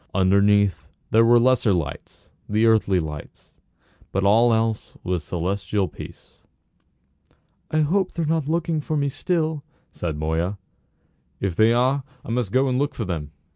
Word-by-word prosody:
Underneath 100 Hz, 0 st, +3 dB, 0.2 s
there 115 Hz, +1 st, +5 dB
were 120 Hz, +1 st, +6 dB
the 120 Hz, -, +3 dB
lesser 130 Hz, -5 st, +3 dB
lights, 85 Hz, -6 st, -5 dB, 0.2 s
the 110 Hz, +2 st, +2 dB
earthly 105 Hz, -4 st, +3 dB
lights, 75 Hz, -3 st, -8 dB, 0.6 s
but 95 Hz, -, -1 dB
all 115 Hz, +4 st, +5 dB
else 110 Hz, -1 st, -1 dB
was 90 Hz, -3 st, -2 dB
celestial 95 Hz, +3 st, -2 dB
peace. -, -, -12 dB, 1.3 s
"I 155 Hz, -, +1 dB
hope 185 Hz, +6 st, +1 dB
they're 165 Hz, -, -2 dB
not 155 Hz, -2 st, 0 dB
looking 165 Hz, -1 st, 0 dB
for 155 Hz, +1 st, -2 dB
me 140 Hz, -1 st, 0 dB
still," 160 Hz, 0 st, -1 dB, 0.3 s
said 80 Hz, -4 st, -4 dB
Moya. 80 Hz, +6 st, -1 dB, 0.8 s
"If 95 Hz, -4 st, -2 dB
they 110 Hz, +3 st, +4 dB
are 130 Hz, +3 st, +2 dB, 0.2 s
I -, -, -5 dB
must 120 Hz, -4 st, -1 dB
go 130 Hz, +4 st, +2 dB
and 130 Hz, 0 st, 0 dB
look 145 Hz, 0 st, -1 dB
for 115 Hz, -, -3 dB
them." 80 Hz, -5 st, -4 dB
110 Hz, 155 wpm, -23 LUFS, 95-140 Hz, 1.3 s, were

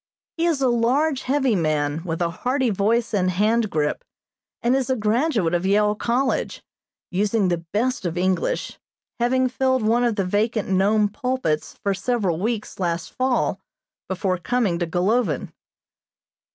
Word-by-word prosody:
He 335 Hz, +1 st, +1 dB
is 300 Hz, -5 st, +1 dB
a -, -, +4 dB
large, 255 Hz, +5 st, +2 dB
heavy 265 Hz, -3 st, +1 dB
man, 155 Hz, -2 st, 0 dB
with 170 Hz, -1 st, -2 dB
a 170 Hz, -, -1 dB
hearty 250 Hz, +6 st, 0 dB
voice 225 Hz, +4 st, +1 dB
and 185 Hz, -3 st, +2 dB
hand 215 Hz, +4 st, +1 dB
grip, 150 Hz, -4 st, -1 dB, 0.6 s
and 240 Hz, +2 st, +3 dB
is 270 Hz, -1 st, -1 dB
a 260 Hz, -, +2 dB
graduate 220 Hz, -, +1 dB
of 175 Hz, 0 st, +1 dB
Yale 210 Hz, +2 st, +3 dB
College, 245 Hz, +5 st, -1 dB, 0.5 s
using 205 Hz, +1 st, +1 dB
the 170 Hz, -1 st, -1 dB
best 250 Hz, +3 st, 0 dB
of 175 Hz, -1 st, -3 dB
English, 185 Hz, -, -1 dB, 0.4 s
having 255 Hz, +2 st, +2 dB
filled 260 Hz, -1 st, 0 dB
one 230 Hz, +3 st, +2 dB
of 235 Hz, -3 st, +1 dB
the 195 Hz, -3 st, 0 dB
vacant 210 Hz, +3 st, 0 dB
Nome 205 Hz, +3 st, +3 dB
pulpits 250 Hz, -, -2 dB
for 200 Hz, -, +1 dB
several 195 Hz, -4 st, -1 dB
weeks 215 Hz, +1 st, -3 dB
last 170 Hz, -2 st, -2 dB
fall 255 Hz, -1 st, 0 dB, 0.5 s
before 185 Hz, -1 st, -1 dB
coming 210 Hz, -5 st, 0 dB
to 175 Hz, -, -1 dB
Golovin. 180 Hz, -, 0 dB
215 Hz, 150 wpm, -23 LUFS, 185-250 Hz, 0.6 s, a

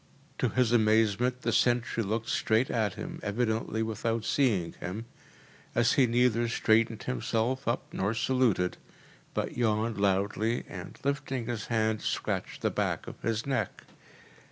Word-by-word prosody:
To 125 Hz, -, +2 dB
his 125 Hz, 0 st, +2 dB
amazement 115 Hz, +2 st, +3 dB
the -, -, +1 dB
sentry 120 Hz, -1 st, +2 dB
looked 110 Hz, +2 st, -2 dB
straight 110 Hz, +3 st, +2 dB
at 110 Hz, -5 st, 0 dB
him, -, -, -6 dB
evidently 110 Hz, +1 st, -1 dB
without 115 Hz, +1 st, -2 dB
seeing 105 Hz, -12 st, +1 dB
him, 100 Hz, +6 st, -5 dB, 0.7 s
as 120 Hz, 0 st, +4 dB
he 130 Hz, -3 st, +4 dB
neither 120 Hz, 0 st, +2 dB
straightened 110 Hz, -1 st, +2 dB
himself 115 Hz, -, -1 dB
up 115 Hz, -, +1 dB
nor 100 Hz, +4 st, 0 dB
saluted, 115 Hz, -7 st, +1 dB, 0.6 s
but -, -, -2 dB
yawned 110 Hz, -2 st, 0 dB
loudly 100 Hz, +4 st, +1 dB
and, -, -, -8 dB
lifting 135 Hz, -3 st, -1 dB
his 115 Hz, -2 st, -4 dB
hand, 110 Hz, -2 st, +1 dB
scratched -, -, -3 dB
the -, -, +2 dB
back -, -, -1 dB
of -, -, -10 dB
his 115 Hz, -1 st, -1 dB
neck. 135 Hz, -2 st, -2 dB
115 Hz, 140 wpm, -29 LUFS, 110-120 Hz, 0.7 s, as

